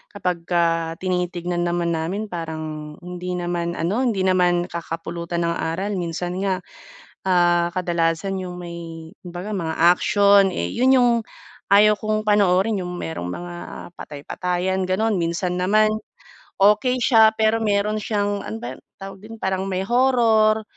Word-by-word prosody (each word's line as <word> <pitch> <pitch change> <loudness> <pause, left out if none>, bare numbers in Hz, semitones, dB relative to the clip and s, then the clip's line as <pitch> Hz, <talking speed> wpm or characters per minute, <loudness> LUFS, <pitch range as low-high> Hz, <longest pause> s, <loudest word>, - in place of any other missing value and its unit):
kapagka 170 -3 0
tinitignan 175 -1 -2
naman 175 0 0
namin, 180 +6 -3
parang 155 -2 -5
hindi 180 0 -5
naman 175 -1 -2
ano, 175 +8 -1
hindi 230 -7 +1
naman 180 -2 +3
kakapulutan 170 +1 -4
ng 170 0 0
aral. 175 +6 -2
Minsan 175 +1 -3
nga, 190 -1 -1 0.6
ah, 175 -2 +3
kadalasan 175 +1 -1
'yung 180 -1 -7
may 170 -1 -8
kumbaga 180 +3 -6
mga 165 -4 -2 0.2
action. 200 0 +4
Eh, 85 - -3
'yon 260 +1 +4
'yung 245 -1 +4 0.6
ayaw 210 +1 +6
kong 215 0 -2
panoorin, 200 0 +3
'yung 180 - -5
merong 90 - -4
mga 175 - -6 0.4
patay-patayan, 180 +6 -3
gano'n. 200 +4 0
Minsan 180 +1 -1
naman, 215 +3 +3 0.6
okey 210 +6 +4
siya 225 -3 +6
pero 220 +1 +2
meron 210 0 0
siyang 205 -1 -1
ano 110 +1 -6
ba 120 +3 -6
'yung - - -18 0.2
tawag 195 0 -9
dun, 225 +1 -10
parang 190 -2 -1
may 185 -1 -1
horror, 230 -3 +3
180 Hz, 140 wpm, -22 LUFS, 170-205 Hz, 0.6 s, ayaw